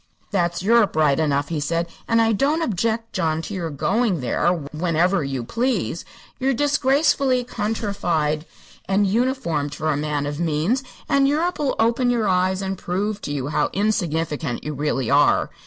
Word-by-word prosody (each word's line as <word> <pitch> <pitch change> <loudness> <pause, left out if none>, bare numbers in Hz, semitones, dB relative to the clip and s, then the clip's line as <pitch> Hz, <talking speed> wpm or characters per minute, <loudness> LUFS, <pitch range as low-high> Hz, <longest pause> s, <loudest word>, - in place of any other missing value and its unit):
"That's 175 -3 0
Europe, 225 -2 +3
right 150 -3 +3
enough," 145 -2 0
he 165 -3 -2
said. 165 +3 -1 0.2
"And 230 0 +3
I 225 - +2
don't 285 +9 +1
object, 225 - -1
John, 160 0 0
to 205 - -6
your 175 -4 -3
going 195 - 0
there 125 +7 +1 0.2
whenever 170 +2 +1
you 135 -3 -3
please. 230 - -1 0.3
You're 265 0 +1
disgracefully 275 -1 +2
countryfied 200 -10 -1 0.4
and 200 +1 +3
uninformed 190 - 0
for 155 +2 -1
a 145 - 0
man 145 -1 -2
of 145 +1 -4
means, 170 - 0 0.2
and 275 -1 +3
Europe'll 300 -1 0
open 235 +2 +2
your 235 -3 +1
eyes 185 +1 +1
and 190 -1 -3
prove 200 +4 -2
to - - -5
you 140 -1 -3
how 150 - +1
insignificant 165 - -1
you 150 - -4
really 135 -3 -1
are. 145 +1 +3
185 Hz, 160 wpm, -22 LUFS, 155-230 Hz, 0.4 s, Europe